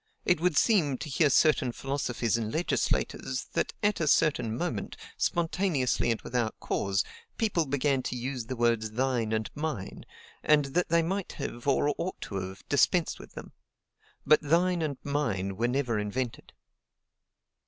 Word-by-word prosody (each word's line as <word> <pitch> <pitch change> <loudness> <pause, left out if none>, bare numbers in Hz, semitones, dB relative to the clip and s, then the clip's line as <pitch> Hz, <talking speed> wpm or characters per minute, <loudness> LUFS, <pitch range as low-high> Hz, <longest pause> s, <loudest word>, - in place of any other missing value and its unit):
It 175 -2 +3
would 175 -4 +2
seem, 165 - +3
to 155 - -6
hear 150 +2 +3
certain 135 -2 +4
philosophers 125 -4 -1
and 110 -2 -2
legislators, 165 +6 -1
that - - 0
at 210 0 +2
a 155 - 0
certain 125 -8 +2
moment, 130 - -3 0.2
spontaneously 165 -8 0
and 115 - +1
without 120 -3 -2
cause, 95 -1 0 0.3
people 190 -8 +1
began 140 0 +1
to - - -4
use 125 -1 -4
the 130 - -3
words 115 -2 +1
THINE 120 -1 0
and 110 -1 -1
MINE; 150 -10 -4 0.4
and 150 -2 +4
that 180 +2 +1
they 170 0 +3
might 190 +3 -2
have, 120 -3 -6
or 145 +2 +3
ought 185 +2 -3
to 100 - -5
have, 95 +1 -6
dispensed 160 +5 +2
with - - -12
them. - - -9 0.7
But 155 - +6
THINE 170 +3 +2
and 145 -4 -2
MINE 110 -10 -1
were 115 +4 +1
never 125 -3 0
invented." 115 +4 -4
135 Hz, 155 wpm, -29 LUFS, 115-160 Hz, 0.7 s, But